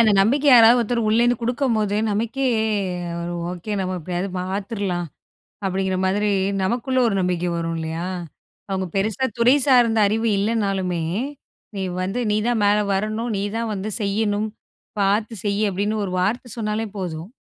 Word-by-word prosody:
அந்த 220 -2 +5
நம்பிக்கை 265 +9 +2
யாராவது 240 -1 +8
ஒருத்தர் 235 -1 0
உள்ளே 225 +2 +4
இருந்து 240 -1 +3
கொடுக்கும்போது, 230 -5 0
நமக்கே 230 +6 -1 0.7
ஒரு 170 +1 -4 0.2
ஓகே, 180 +4 -5
நாம 185 0 -2
எப்படியாவது 180 +3 -3
பாத்துரலாம் 190 -2 -3 0.6
அப்படிங்கிற 190 0 0
மாதிரி 205 +2 +1 0.3
நமக்குள்ள 250 +6 0
ஒரு 210 - 0
நம்பிக்கை 180 -1 0
வரும் 165 0 -2
இல்லையா? 160 +2 -3 0.6
அவங்க 190 -1 -1
பெருசா 215 +6 0
துறைசார்ந்த 245 -2 +4
அறிவு 225 +3 0
இல்லன்னாலுமே, 195 -5 0 0.7
நீ 195 - -3 0.2
வந்து 195 +6 -2
நீ 210 - +2
தான் 240 -3 +1
மேல 205 +1 +4 0.2
வரணும், 215 +4 -1
நீ - - -1 0.2
தான் 230 -1 -2
வந்து 200 +2 -4
செய்யணும், 205 +1 0 0.5
பாத்துச் 210 +1 0
செய்யி 205 +1 +1
அப்படின்னு 205 +3 -1
ஒரு 185 - -5
வார்த்தை 230 +7 -1
சொன்னாலே 220 0 -2
போதும். 170 -2 -5
210 Hz, 145 wpm, -22 LUFS, 190-230 Hz, 0.7 s, யாராவது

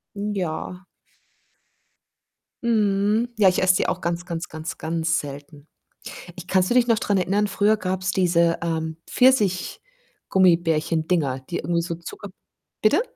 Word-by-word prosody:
Hm, 205 +1 -3
ja. 180 +1 -4 1.8
Mhm, 215 0 +1
ja, 205 -3 +5
ich 180 - +2
esse 185 -1 +4
die - - 0
auch - - -1
ganz, 170 +1 -2
ganz, 170 -1 -5
ganz, 160 +1 -7
ganz 165 +1 -1
selten. 145 +1 -10 0.7
Ich 180 -1 -10
kannst 185 -1 +2
du - - +2
dich 245 -1 +4
noch 230 -2 +3
dran 200 -2 0
erinnern? 200 +3 +1
Früher 210 +2 +2
gab's 190 -1 -2
diese, 170 -2 +2
ähm, 160 -1 -3
Pfirsich-Gummibärchen-Dinger, 180 - +1
die - - -2
irgendwie 170 +2 0
so 170 0 -4
Zucker 170 +4 -9 0.5
bitte? 290 - +4
180 Hz, 135 wpm, -23 LUFS, 165-205 Hz, 1.8 s, ja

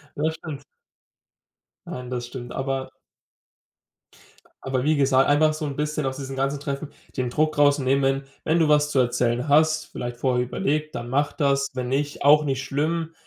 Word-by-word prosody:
Ja 155 +2 0
stimmt. 150 -3 -8 1.2
Nein, 125 -1 -6
das 120 -1 -4
stimmt, 120 -1 -8
aber 135 0 -3 1.7
Aber 130 -1 -1
wie 155 +1 +3
gesagt, 135 -1 +3
einfach 155 +1 +4
so 155 0 -4
'n 140 -2 -4
bisschen 150 -1 -2
aus 130 +1 -2
diesem 135 -1 -6
ganzen 135 +1 -1
Treffen 140 +1 -4 0.3
den 125 -1 -1
Druck 155 +3 0
rausnehmen, 140 -2 +3
wenn 135 +1 +1 0.2
wenn 165 +2 +2
du 160 - +4
was 150 0 +3
zu 135 - +1
erzählen 120 +1 +1
hast, 155 +2 +3
vielleicht 120 0 -5
vorher 125 -1 +1
überlegt, 150 +5 -2
dann 120 0 -5
mach 145 +3 +1
das, 140 -2 +1
wenn 125 -1 -3
nicht, 145 +2 -2
auch 150 +1 +6
nicht 135 -1 -1
schlimm 160 +4 -1
140 Hz, 170 wpm, -24 LUFS, 130-150 Hz, 1.7 s, auch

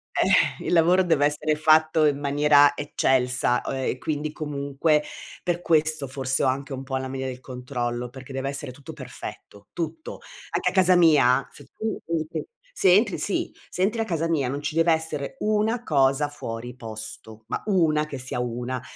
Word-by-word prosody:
eh, - - +2
il - - 0
lavoro 175 +3 +5
deve 160 -5 +2
essere 150 +1 +1
fatto 155 +1 +4
in 145 -2 +2
maniera 145 0 +4
eccelsa, 125 -3 +1
o - - -3
ehm, 130 -1 -2
quindi 150 +1 -3
comunque 150 0 0 0.4
per 175 0 -2
questo 155 -3 +2
forse 130 0 -1
ho - - +3
anche 135 +2 -2
un 130 - -5
po' 135 -1 -3
la 130 0 -4
mania 130 0 -4
del 130 -1 -5
controllo, 125 -2 -4
perché 130 +1 -11
deve 135 +1 -3
essere 140 -1 -4
tutto 135 +2 -11
perfetto, 100 -1 -10
tutto. 160 -2 -5 0.3
Anche 180 +1 +1
a - - -6
casa 185 -1 +5
mia, 140 -6 +4
se - - -14
tu 220 0 -3
entri 160 -1 -3 0.3
se 185 - +4
entri 210 -2 +2
si, 200 - -2 0.2
se 180 - -2
entri 220 +4 +1
a - - +2
casa 165 -6 -1
mia, 155 -6 0
non 140 +2 -3
ci 150 - -2
deve 165 +1 +4
essere 160 - -2
1 215 +3 0
cosa 140 - +2
fuori 120 -4 -7
posto, 110 -1 -8
ma - - -3
1 155 -6 +2
che 140 - -6
sia 130 -1 -4
1. 125 +1 -3
145 Hz, 185 wpm, -24 LUFS, 130-160 Hz, 0.4 s, lavoro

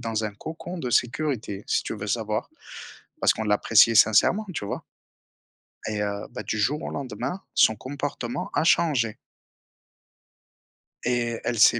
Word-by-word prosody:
dans 115 -2 -2
un 105 - -3
cocon 165 - -7
de 125 -6 -3
sécurité, 120 -5 0
si - - +1
tu - - -3
veux 105 0 -6
savoir 110 0 -2 0.7
parce - - +4
qu'on 110 - -4
l'appréciait 105 +2 +5
sincèrement, 115 - +5
tu 105 - -4
vois? - - -4 1.1
Et 105 -1 -2
heu, 100 0 -3
bah, - - -6
du 110 - -2
jour 140 +9 +1
au - - -3
lendemain, 140 +7 -4
son 110 - +5
comportement 130 0 -4
a 145 - +2
changé. 135 -10 +2 1.9
Et 120 -1 0
elle 120 - -1
s'est 120 +2 +6
115 Hz, 150 wpm, -25 LUFS, 105-140 Hz, 1.9 s, s'est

